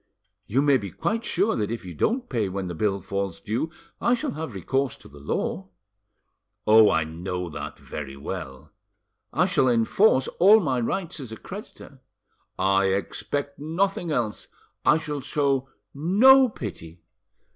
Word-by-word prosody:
"You 135 +6 +2
may 140 -2 +5
be 100 -5 -6
quite 225 - -2
sure 200 0 +1
that 105 -2 -1
if 115 -3 -5
you 90 - -7
don't 245 - 0
pay 110 -7 -1
when 95 0 -4
the 90 - -4
bill 100 +3 0
falls 100 -1 -3
due, 115 +10 -2 0.3
I 240 - +3
shall 235 - -3
have 150 -7 -6
recourse 135 +8 -1
to - - -16
the 70 - -14
law." 95 +6 -3 1.0
"Oh, 110 0 +7
I 80 - +2
know 90 +2 -5
that - - -6
very 70 -2 -7
well." 65 -1 -7 0.6
"I - - +2
shall 130 - +2
enforce 130 - +3
all 205 +5 +8
my 135 - 0
rights 170 +7 -2
as 130 -5 -8
a 110 - -7
creditor." - - -10 0.6
"I 95 +1 +3
expect 140 +9 -2
nothing 175 +5 -1
else." 120 -8 -2 0.4
"I 150 - +5
shall 150 -3 -4
show 135 -1 0 0.2
no 240 - +6
pity." 85 - -8
125 Hz, 155 wpm, -25 LUFS, 95-160 Hz, 1.0 s, all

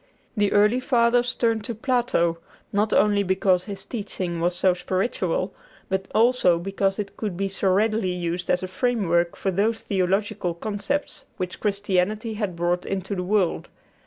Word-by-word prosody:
The 205 -2 +2
early 210 +4 +4
Fathers 245 -1 +2
turned 225 -2 +1
to 235 - -3
Plato, 235 -9 +1 0.3
not 210 +2 +1
only 205 -1 +4
because 190 -1 +2
his 195 -2 -7
teaching 185 -6 -4
was 175 +1 +1
so 185 0 +3
spiritual, 185 0 -1 0.4
but 190 0 -1
also 225 -6 +4
because 195 +2 -1
it 200 -1 -5
could 205 -6 -4
be 195 +1 0
so 195 0 -1
readily 215 +1 +2
used 175 0 -3
as 180 +1 +2
a - - -2
framework 185 -5 +1
for 195 - -1
those 215 +5 0
theological 195 -1 0
concepts 210 +9 -3
which 180 -1 -4
Christianity 205 +2 0
had 205 -4 -3
brought 175 +1 0
into 190 +1 -3
the 180 - -2
world. 190 -1 0
195 Hz, 160 wpm, -24 LUFS, 180-215 Hz, 0.4 s, early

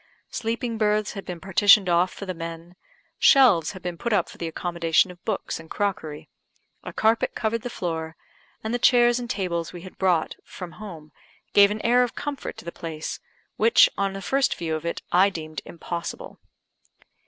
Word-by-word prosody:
Sleeping 230 0 -3
berths 210 -1 +1
had 195 - -7
been 180 -2 -6
partitioned 195 +2 +5
off 175 +1 +3
for 200 - -8
the 185 - -3
men; 165 +1 -8 0.4
shelves 240 - +5
had 185 - -11
been 175 -1 -5
put 235 - -2
up 195 -5 +2
for - - -14
the 170 - -3
accommodation 170 +1 +1
of 175 0 -16
books 215 -6 -2
and 165 0 -13
crockery, 170 -7 -3 0.6
a - - -6
carpet 225 +1 +1
covered 225 0 -1
the 245 - -5
floor, 160 -6 -4 0.5
and 220 +1 -3
the 245 - 0
chairs 240 0 +5
and 240 -1 -6
tables 175 -7 -2
we 175 - -8
had 185 - -12
brought 180 -4 +1
from 175 -4 -10 0.4
gave 200 0 +7
an 210 +1 -4
air 245 +2 +5
of 245 -2 -1
comfort 290 -2 -5
to - - -11
the 170 - -5
place, 160 -2 -6 0.4
which, 225 +2 +6
on 195 -1 -1
the 195 0 -7
first 270 +7 +1
view 165 -2 -3
of 155 +1 -3
it, - - -4
I 185 +3 +5
deemed 155 -5 -6
impossible. 170 0 -6
185 Hz, 185 wpm, -25 LUFS, 170-220 Hz, 0.6 s, gave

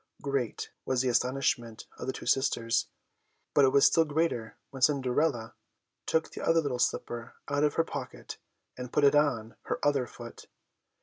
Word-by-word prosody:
Great 140 -5 -2
was 130 -1 0
the 130 - +1
astonishment 125 -2 0
of - - -5
the 130 - -1
two - - -8
sisters, 115 -4 +1 0.7
but 145 - +5
it - - +5
was 140 +1 +5
still 165 - +5
greater 150 -7 -1
when 135 -1 -9
Cinderella 130 -3 +1 0.5
took 160 0 +1
the - - -7
other 165 0 +3
little 140 -6 -2
slipper 120 -1 -2
out 145 0 0
of 150 -1 +2
her 165 - +3
pocket - - -7 0.4
and 125 -1 -7
put 150 - +2
it 140 - +6
on 130 -7 +1
her - - -1
other 140 -4 +2
foot. - - -11
135 Hz, 170 wpm, -29 LUFS, 120-145 Hz, 0.7 s, it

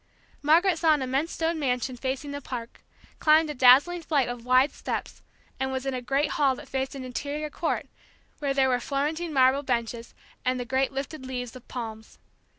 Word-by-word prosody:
Margaret 325 +4 +4
saw 320 -2 +5
an 280 - -2
immense 270 +6 -1
stone 325 0 -1
mansion 255 -2 -1
facing 265 +3 -3
the 285 0 -5
park, 240 -3 -7 0.4
climbed 310 0 +4
a - - -4
dazzling 275 +7 +6
flight 290 -5 +1
of 245 -1 -6
wide 255 +3 +4
steps, - - -5 0.4
and 265 0 -1
was 260 0 -3
in 270 - -1
a 255 - -3
great 275 +4 0
hall 275 -3 +2
that 290 +2 -11
faced 265 +1 -3
an 270 - -6
interior 285 +5 -4
court, 330 - -2 0.5
where 285 -2 -1
there 265 -1 +3
were 250 -1 +2
Florentine 300 +6 -2
marble 265 0 +4
benches, 235 -3 -3 0.3
and 255 0 0
the 245 - -3
great 265 +2 +1
lifted 275 +1 -5
leaves 245 -2 -5
of 255 - -12
palms. 220 -3 -7
270 Hz, 190 wpm, -27 LUFS, 255-295 Hz, 0.5 s, dazzling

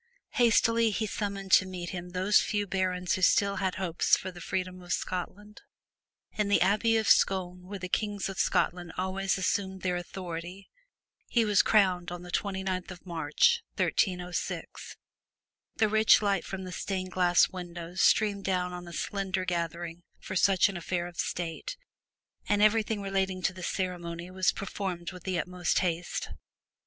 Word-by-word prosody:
Hastily 230 -1 +4
he 215 +1 -1
summoned 200 -2 -4
to 185 - +6
meet 180 -2 -5
him 180 -2 -6
those 185 +3 +3
few 205 -1 -1
barons 185 -2 -1
who 185 - -1
still 200 +2 +3
had 190 -1 -1
hopes 180 -3 +2
for 185 - -6
the 175 -1 -11
freedom 185 +1 -3
of 175 0 -3
Scotland. 205 +4 -5 0.7
In 210 -1 0
the 200 - +4
Abbey 215 +4 +3
of 220 -2 0
Scone 180 -1 +2
where 200 +1 -5
the 185 -1 -5
Kings 205 +1 -1
of 195 -1 -6
Scotland 175 -2 0
always 190 +1 -1
assumed 190 0 -1
their 180 -1 0
authority, 175 +1 -7 0.6
he 235 -2 +2
was 210 -2 +5
crowned 185 -5 +2
on 175 0 -6
the 175 - -9
twenty 190 -1 -2
ninth 185 -2 -2
of 180 0 -10
March, 170 - +2
1306. 180 -2 -2 0.8
The 220 - +3
rich 220 +1 +5
light 200 -2 +1
from 190 -1 -5
the 185 - -7
stained 185 0 -3
glass 175 -1 +4
windows 175 0 -5
streamed 205 -2 +3
down 180 -2 -1
on 175 0 -7
a 170 - -9
slender 190 +1 -2
gathering 170 -1 -3 0.2
for 190 - -7
such 190 0 +4
an 195 -3 -4
affair 175 0 -2
of 175 -1 -10
state, 175 - -3 0.7
and 205 0 +3
everything 215 -1 +2
relating 190 -1 -1
to 195 - +1
the 185 - -10
ceremony 175 -1 -3
was 185 0 +2
performed 190 -3 -4
with 180 -2 -12
the 185 -1 -1
utmost 180 0 -1
haste. 175 -1 -1
185 Hz, 165 wpm, -29 LUFS, 180-200 Hz, 0.8 s, to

